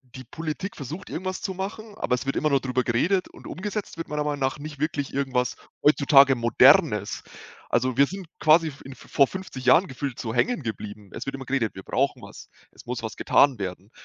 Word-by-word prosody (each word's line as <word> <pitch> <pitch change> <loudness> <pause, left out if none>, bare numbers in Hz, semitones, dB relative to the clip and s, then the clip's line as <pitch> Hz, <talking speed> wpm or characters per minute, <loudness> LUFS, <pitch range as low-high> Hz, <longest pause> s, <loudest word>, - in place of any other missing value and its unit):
Die 130 - -8
Politik 160 - -5
versucht 155 +8 -7
irgendwas 185 +2 -4
zu 190 - -3
machen, 205 +3 -6
aber 125 - 0
es 125 - -6
wird 135 - -1
immer 155 - +1
nur 140 -1 +3
drüber 130 -1 -1
geredet 175 +12 +1
und - - -16
umgesetzt 210 +2 -5
wird 165 - -5
meiner 150 0 -2
Meinung 145 -1 -2
nach 130 +1 0
nicht 145 -1 -8
wirklich 145 -2 -2
irgendwas 130 -3 0 0.3
heutzutage 140 -2 +6
Modernes. 120 -1 +4 0.5
Also 125 +1 +1
wir 140 - +6
sind 195 +2 -7
quasi 160 +1 +5
f 140 - -13
in 135 0 -10
v - - -16
vor 140 - +4
50 185 -8 -7
Jahren 160 +9 +5
gefühlt 135 -1 -5
so 110 -2 -4
hängen 160 - +1
geblieben. 105 -3 -7
Es - - -7
wird 135 - -3
immer 135 -1 -8
geredet: 125 -4 -1
„Wir 95 - -8
brauchen - - -1
was, - - -12 0.2
es - - -16
muss - - -4
was - - -5
getan 135 -6 +4
werden“, 95 +2 -6
140 Hz, 215 wpm, -25 LUFS, 125-165 Hz, 0.5 s, heutzutage